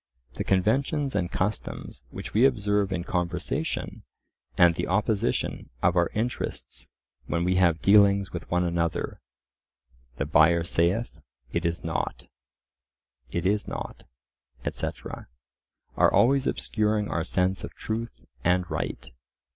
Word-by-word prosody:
The - - -3
conventions 135 - +1
and 90 -3 -1
customs 100 -8 -3
which - - -8
we 110 - +4
observe 105 -6 +2
in 90 -2 -1
conversation, 90 - -2 0.6
and 85 -1 +6
the - - -3
opposition 110 +3 0
of 85 +1 +4
our 85 -1 +3
interests 115 +3 -3 0.4
when 85 0 0
we 90 +1 +2
have 85 -3 +3
dealings 100 -1 +5
with 85 -2 -6
one 90 0 +2
another 85 -1 -1 1.0
("the 70 - -1
buyer 80 +2 +4
saith, 85 +7 0 0.3
it 85 0 0
is 85 +1 -3
nought—it 65 -1 -7
is 105 +2 +1
nought," - - -6 0.6
etc.), - - -5 0.7
are - - +5
always 135 +3 +4
obscuring 105 -1 0
our 80 -4 -1
sense 90 +2 0
of - - -7
truth 115 +1 -5 0.2
and 90 +1 +2
right. - - -4
90 Hz, 125 wpm, -27 LUFS, 85-105 Hz, 1.0 s, and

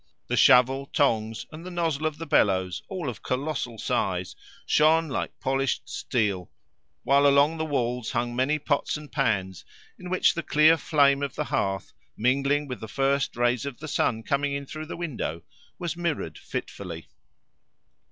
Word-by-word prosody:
The - - -1
shovel, 130 +2 +5
tongs, 110 -7 0
and 160 +1 -9
the 185 - -7
nozzle 165 -4 -1
of 155 -1 -4
the 165 - -6
bellows, 95 - +2
all 185 -6 -4
of 125 - -5
colossal 130 -3 -3
size, - - -1 0.3
shone 160 +1 +4
like 130 - -4
polished 135 0 -1
steel, 100 -7 -1 0.5
while 140 +1 +4
along 140 +3 +4
the 160 - 0
walls 125 -5 -1
hung 120 0 -2
many 130 +5 +2
pots 145 0 -1
and 150 -1 -11
pans 95 - -1 0.4
in 180 - -8
which 185 0 +3
the 170 - -3
clear 155 +1 +5
flame 140 -3 +3
of 140 -1 -3
the - - -1
hearth, 95 -1 -1 0.2
mingling 140 +5 +1
with 125 -2 -5
the 110 - -7
first 135 +4 0
rays 120 -1 +2
of 140 -4 -5
the 155 - -8
sun 115 -5 0
coming 140 +2 0
in 140 0 -3
through 155 +3 -7
the - - -6
window, 135 - -4 0.3
was 175 -2 -3
mirrored 165 - -2
fitfully. 85 -4 -6
140 Hz, 165 wpm, -26 LUFS, 120-155 Hz, 0.5 s, shovel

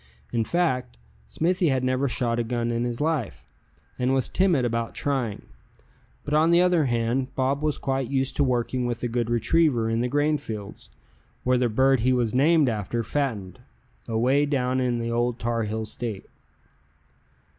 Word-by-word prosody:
In 115 -1 +1
fact, 130 - -1 0.3
Smithy 175 - +1
had 130 -2 0
never 130 +2 +1
shot 120 -2 0
a - - +1
gun 120 0 -2
in 120 +1 -1
his 120 +2 -3
life, 150 -8 -2 0.5
and 125 +1 +2
was 130 - 0
timid 175 -9 +2
about 115 -1 -2
trying; 130 -7 -2 0.8
but 145 - -3
on 155 +2 +4
the 170 0 +5
other 180 -4 +3
hand 120 +1 0
Bob 135 +2 0
was 150 -1 0
quite 135 -2 -2
used 135 -1 -1
to 145 - +3
working 125 -1 0
with 120 0 -4
a - - +1
good 120 -1 -1
retriever 120 0 +2
in 115 +1 0
the 125 - 0
grain 145 +3 +1
fields, 105 - -8 0.5
where 125 0 +2
the 125 -1 +2
bird 130 +3 +3
he 130 +3 +2
was 120 -3 0
named 150 +3 +4
after 115 +1 -2
fattened, 110 -8 -3 0.5
away 130 +6 +2
down 130 -2 0
in 125 -2 0
the 115 0 -3
Old 120 0 0
Tarheel 110 -2 -2
State. 110 -2 -5
125 Hz, 170 wpm, -25 LUFS, 115-140 Hz, 0.8 s, the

